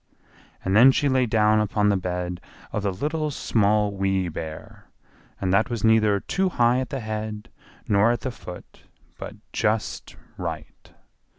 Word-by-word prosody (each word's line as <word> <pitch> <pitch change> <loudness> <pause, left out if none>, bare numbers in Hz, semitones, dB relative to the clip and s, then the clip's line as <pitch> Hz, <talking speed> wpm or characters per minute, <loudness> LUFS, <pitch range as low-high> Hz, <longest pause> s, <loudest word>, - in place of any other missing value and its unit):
And 95 - +1
then 125 +5 +8
she 145 - +1
lay 130 -2 +2
down 110 -1 +3
upon 105 0 +1
the 100 - +3
bed 90 -1 -3 0.3
of 105 - -2
the 100 -1 0
Little, 150 - -2
Small, 105 -6 +1
Wee 95 -2 0
Bear, 80 -1 -8 0.5
and 95 -1 0
that 110 +5 +3
was 115 -4 -4
neither 110 -2 +4
too 190 - -1
high 120 -5 +2
at 130 - -3
the 135 -3 -4
head 110 0 -5 0.4
nor 105 0 +4
at 120 -2 0
the 130 - -3
foot, 90 -6 -11 0.4
but - - -7 0.2
just 105 0 -1 0.2
right. - - -7
105 Hz, 160 wpm, -24 LUFS, 100-120 Hz, 0.5 s, then